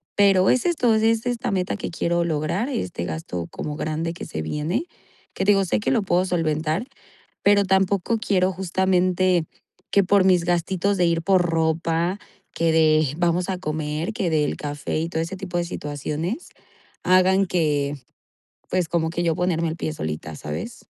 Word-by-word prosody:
Pero, 195 -2 +5
es 255 - +2
esto, 255 -10 +2
es 225 +1 +2
esta 245 -1 -1
meta 185 +1 -1
que - - -4
quiero 170 +1 0
lograr 165 - -1
este 90 - -3
gasto 85 +1 -5
como 150 -1 -5
grande 155 +2 -2
que 175 - -8
se 80 - -5
viene 155 - -2 0.5
que - - -2
digo 195 -1 +4
sé - - 0
que 210 - -1
lo 240 -5 +2
puedo 180 0 +2
solventar, 160 +2 0 0.6
pero 200 0 +5
tampoco 190 +3 +2
quiero 190 -3 +1
justamente 185 -1 +1 0.5
que 200 - +4
por 195 0 +4
mis 180 -3 +4
gastitos 185 +3 0
de 180 - +2
ir 165 0 +1
por 185 +1 +3
ropa 165 +2 0 0.4
que 165 -1 +1
de 155 -3 +3
vamos 175 +2 +1
a 185 - -2
comer, 155 +2 -3
que 185 -5 -1
del 150 -2 +1
café 145 +1 -4
y 165 - -2
todo 160 - -1
ese 180 +4 -5
tipo 180 -2 -4
de 175 - 0
situaciones 155 - -4 0.6
hagan 185 +1 +4
que, 150 -5 0 0.7
pues, 180 -3 0
como 160 -1 0
que 175 +1 -2
yo 165 -2 +1
ponerme 170 -2 0
el 160 - -4
pie 155 - -2
solita, 80 - -5
¿sabes? 75 +1 -6
175 Hz, 170 wpm, -23 LUFS, 155-190 Hz, 0.7 s, Pero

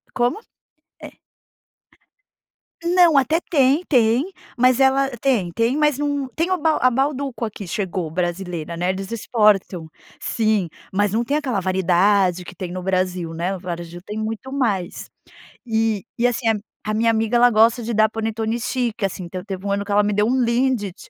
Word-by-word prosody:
Como? 245 - +1 0.6
É. - - -11 1.7
Não, 345 -3 +4
até 310 +5 +3
tem, 280 +1 +3
tem, 250 - +2 0.2
mas 255 +1 +3
ela 270 0 +3
tem 225 -9 0
tem 230 +7 +1
mas 300 -2 +2
num 285 -2 -1
tem 335 +3 0
o - - +4
a 305 -6 +3
Bauducco 270 -1 -1
aqui 205 -3 -5
chegou, 185 -5 -3
brasileira 175 -1 -3
né. 180 +2 0
Eles 195 +2 -6
exportam, 210 -7 +1 0.3
sim. 215 -6 0 0.2
Mas 205 0 +1
não 230 +2 +1
tem 285 +5 0
aquela 255 -9 -1
variedade 185 0 +2
que 180 - -11
tem 180 0 -6
no 185 0 -5
Brasil, 185 -3 -1
né. 175 +4 -2
O - - -8
varejo 175 -1 -6
tem 210 +1 -6
muito 225 +4 -5
mais. 215 -10 -2 0.6
E 225 -3 0
e 240 - +3
assim 245 -1 0
a 225 - +4 0.3
a 215 - -2
minha 230 +1 +2
amiga 225 +1 +1
ela 245 +1 +6
gosta 230 +2 +4
de 230 +1 -3
dar 220 0 +4
panetone 225 +1 -2
chique, 235 -3 -2
assim. 185 -1 -3
Então 180 +1 -7
teve 195 -2 -6
um - - -1
ano 200 0 0
que 205 - -4
ela 210 - +4
me 205 0 0
deu 210 +1 +2
um 255 +2 +2
Lindt, 235 -5 0
220 Hz, 175 wpm, -21 LUFS, 190-255 Hz, 1.7 s, ela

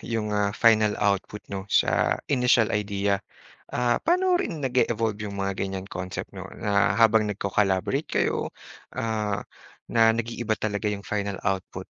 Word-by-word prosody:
yung, 110 -2 -3
ah, 105 -1 +2
final 110 -2 +4
output 100 +1 -1
'no, 95 0 -5
sa - - +2
initial 125 -4 +3
idea? 100 -2 0 0.5
Ah, 120 -1 +1
paano 365 +2 +2
rin 165 - -4
nag-e-evolve 115 -4 0
yung 100 - -7
mga 100 0 -1
ganyang 95 -1 -3
concept 90 0 -5
'no, - - -8
na 100 +1 +2
habang 110 -2 +4
nagko-collaborate 100 -1 0
kayo, - - 0 0.5
ah, 110 -3 -1 0.5
na 115 -1 +5
nag-iiba 115 -1 -2
talaga 105 0 -2
yung 100 -1 -4
final 100 -1 -2
output. 95 -2 -2
105 Hz, 140 wpm, -26 LUFS, 100-115 Hz, 0.5 s, na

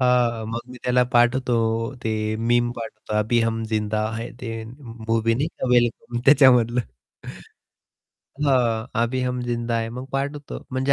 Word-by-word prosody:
हां, 120 -3 +2
मग 115 +1 -3
मी 125 - -10
त्याला 125 0 +3
पाठवतो 120 0 +3 0.5
ते 110 -1 0 0.2
मीम 120 +1 +2
पाठवतो 110 -2 -7
अभी 115 +3 +2
हम 115 0 0
जिंदा 110 0 0
है 115 +1 -5
ते 115 -2 -5
मूवी 115 -2 -2
नाही 145 +6 0
का 130 - -5
"वेलकम" 120 0 +1
त्याच्यामधलं. 125 -4 +6 1.6
हां. 120 -5 +2 0.2
अभी 130 +2 -1
हम 125 0 -1
जिंदा 120 -1 -1
है. 115 - -2
मग 125 +2 -6
पाठ 140 +2 -1
होतं 145 -1 -8
म्हणजे 130 +2 +1
120 Hz, 150 wpm, -23 LUFS, 115-125 Hz, 1.6 s, त्याच्यामधलं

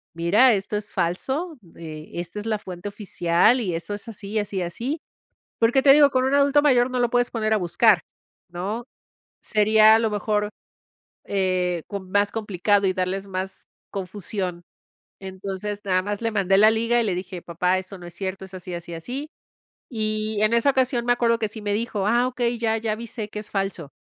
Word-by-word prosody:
mira, 210 +9 +5
esto 200 +1 -1
es 205 - -7
falso. 270 - -2 0.2
Eh, 155 -2 -9
esta 175 +4 -5
es 215 - -6
la 215 -1 +1
fuente 185 +1 -7
oficial, 200 +3 +2
y 180 -6 -2
eso 175 +5 -4
es, 205 +3 -7
así, 210 0 -4
así 205 -1 -3
y - - 0
así". 240 - -3 0.6
Porque, 235 +4 +4
te 275 - +8
digo, 290 -1 +7
con 255 0 +2
un 270 - +1
adulto 285 +1 +4
mayor, 255 -4 +4
no 250 - -1
lo 240 - +2
puedes 245 0 +1
poner 220 -2 -1
a - - +3
buscar, 190 +2 +4 0.5
¿no? 200 +7 -4 0.6
Sería 215 0 +5
a - - +4
lo 225 -1 +1
mejor, 210 0 0 0.8
eh, 185 -3 0
com 195 -3 -6
más 205 +1 +2
complicado, 205 -2 +1
y 185 - +1
darles 190 +1 -2
más 190 0 -5 0.2
confusión. 190 -2 -4 0.6
Entonces, 195 +2 -5
nada 185 -1 +2
más 205 +2 -3
le 230 -1 0
mandé 195 -2 +2
la 215 +2 +7
liga, 230 +2 +1
y - - +1
le 185 -4 0
dije: 180 -1 -6
"Papá, 180 +2 0
eso 190 +1 -9
no 175 - -11
es 170 - -11
cierto, 190 -1 -4
es 190 - -13
así, 180 -1 -7
así, 170 0 -7
así". 255 - -6 0.6
Y 215 -2 -2
en 215 +2 +3
esa 235 +4 +4
ocasión, 255 -2 +1
me 245 - +4
acuerdo 235 -1 +1
que 220 - 0
sí 220 0 -8
me 205 0 -1
dijo: 210 -2 -2
"Ah, 240 +3 +3
okey, 240 -2 -1
ya 225 -1 +1
ya 220 -1 -2
avisé 225 -1 -5
que 210 - -6
es 210 - -8
falso". 195 -6 -2
210 Hz, 200 wpm, -24 LUFS, 185-230 Hz, 0.8 s, te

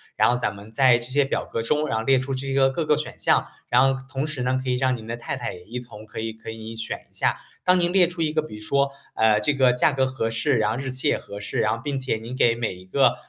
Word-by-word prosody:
然 - - +4
后 125 - +1
咱 120 - -1
们 105 +2 -12
在 125 +1 +5
这 120 +1 -8
些 145 0 +3
表 135 - -2
格 115 - -3
中 150 +6 0
然 - - 0
后 110 - -1
列 135 -1 +5
出 135 +1 -3
这 135 +1 -3
个 135 0 +4
各 155 +4 -2
个 150 - +4
选 150 - -5
项， - - +3 0.2
然 125 +1 +4 0.2
后 - - -9
同 135 +2 -2
时 155 -5 -4
呢， 130 +1 +1
可 130 - -3
以 125 - +2
让 130 0 +2
您 110 -2 -9
的 115 +1 -4
太 120 - -4
太 120 -3 -4
也 90 - -12
一 120 +4 -5
同 110 -3 -12
可 110 +1 -6
以 115 0 -3
可 110 +1 -10
以 110 0 -7
选 110 - -4
一 - - -32
下。 - - +1 0.3
当 180 0 +5
您 175 0 +2
列 185 -2 +5
出 175 0 -6
一 155 -1 +1
个 155 0 +1
比 150 -9 -9
如 105 - -10
说， 140 +5 +1 0.2
呃， 110 -1 +4
这 145 - +2
个 130 -3 +4
价 125 +4 +3
格 135 -1 +1
合 130 -3 -2
适， 125 +4 +1
然 110 -1 +2
后 115 - -2
日 135 0 -4
期 130 +3 0
也 - - +2
合 100 +1 -9
适， 100 - -3
然 110 0 +2
后 115 - -9
并 140 -2 -2
且 130 -3 -1
您 115 +3 -7
给 120 -2 +3
每 115 -5 -2
一 90 +1 -14
个 95 - +3
125 Hz, 335 characters per minute, -24 LUFS, 110-140 Hz, 0.3 s, 在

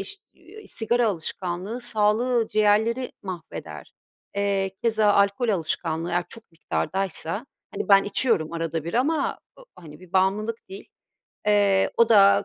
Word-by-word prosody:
iş 405 - -7 0.5
sigara 235 +1 0
alışkanlığı 185 +4 -4
sağlığı, 235 +1 +1
ciğerleri 215 +4 +2
mahveder. 180 -5 -8 0.4
Eee, 200 -1 0
keza 220 -3 +3
alkol 200 +4 +2
alışkanlığı 165 -3 -1
eğer 175 0 0
çok 225 -6 -10
miktardaysa, 190 - -2 0.3
hani, - - -4
ben 195 -1 +6
içiyorum 205 -6 +1
arada 165 -2 -3
bir 170 - -5
ama 280 +4 0 0.2
ı - - -14
hani, 155 -3 -13
bir 185 -1 -16
bağımlılık 210 +4 0
değil. 390 +1 -10 0.6
Eee, 200 -2 +3
o 235 -1 +4
da 200 -2 +6
200 Hz, 130 wpm, -24 LUFS, 180-230 Hz, 0.6 s, ben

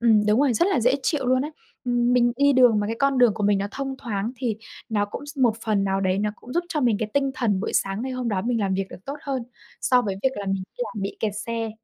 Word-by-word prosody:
Ừm, 220 -3 +4
đúng 210 +5 +4
rồi, 280 -4 +3
rất 345 - +3
là 280 -11 +2
dễ 250 +4 +3
chịu 285 -5 0
luôn 255 +1 +3
á. 300 - -4 0.3
Ừm, 245 0 +2
mình 240 -1 +4
đi 285 0 +4
đường 245 -5 +5
mà 205 - -1
cái 225 +1 -3
con 275 -1 +2
đường 240 -4 +5
của 215 - -4
mình 205 -1 +3
nó 200 - -1
thông 270 +1 -4
thoáng 220 0 -3
thì 230 -5 -2 0.3
nó 210 -2 +1
cũng 285 - -7
s 290 0 -9
một 235 -4 +3
phần 205 -3 +1
nào 195 0 0
đấy 190 0 +1
nó 210 0 0
cũng 250 - -11
giúp 345 +2 0
cho 300 - -1
mình 235 -5 +3
cái 215 -2 -3
tinh 275 -1 +2
thần 205 -7 0
buổi - - -3
sáng 195 +4 0
ngày 260 0 -3
hôm 250 -2 -2
đó 190 -3 0
mình 235 -1 0
làm 190 -2 0
việc 195 0 -1
được 185 - -11
tốt 280 +2 -4
hơn, 270 -3 -2 0.4
so 250 -1 +3
với 195 -3 -2
việc 265 - +4
là 200 - -5
mình 195 -1 -1 0.2
đi - - 0
làm 205 - -4
bị 195 - -4
kẹt 215 -2 0
xe. 230 -1 -2
230 Hz, 300 wpm, -24 LUFS, 205-260 Hz, 0.4 s, đường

